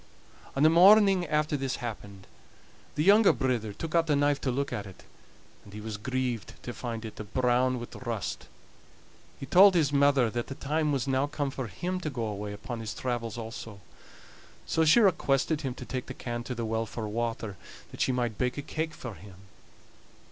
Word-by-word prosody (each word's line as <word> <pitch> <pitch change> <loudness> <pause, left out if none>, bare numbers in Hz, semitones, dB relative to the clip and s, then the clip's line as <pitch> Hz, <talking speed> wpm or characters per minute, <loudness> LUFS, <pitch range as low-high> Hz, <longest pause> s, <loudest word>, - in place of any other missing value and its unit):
On 135 - +2
the 155 - +7
morning 190 +1 +6
after 150 0 +1
this 135 -2 -2
happened 100 -4 -7 0.7
the 150 - +1
younger 205 +3 +7
brither 125 -5 -1
took 155 +10 -6
out 165 -1 +3
the 150 - +3
knife 145 0 +2
to 135 - -1
look 140 +3 -1
at 105 - -4
it, 95 - -13 0.6
and 100 - -15
he 105 - -7
was 105 -1 -5
grieved 125 0 -3
to 120 - -5
find 115 -2 -5
it 110 - -9
a' - - -4
brown 125 +3 +1
wi' 120 - -5 0.2
rust. 110 -11 -4 0.9
He - - -6
told 190 +7 +7
his 150 -4 +2
mother 140 -4 +4
that 120 +1 -3
the 135 - -6
time 150 +2 0
was 135 -2 -1
now 135 +1 +1
come 145 -1 -2
for 130 -2 -4
him 180 - -3
to 160 - -3
go 120 -5 -3
away 105 -1 -4
upon 110 +4 -6
his 110 -1 -5
travels 120 -3 -3
also; 115 -2 -7 0.9
so 160 - +1
she 160 +9 +6
requested 160 - +2
him 130 -4 -3
to - - -8
take 130 -1 -4
the 130 - -7
can 120 -1 -4
to 125 - -4
the 115 -1 -3
well 110 0 -1
for 110 0 -5
water, 115 -2 -3 0.4
that - - -7
she - - +2
might 120 -4 -2
bake 125 +1 0
a 145 - -3
cake 160 +2 -3
for 120 -3 -7
him. 95 +2 -13
130 Hz, 200 wpm, -28 LUFS, 115-145 Hz, 0.9 s, the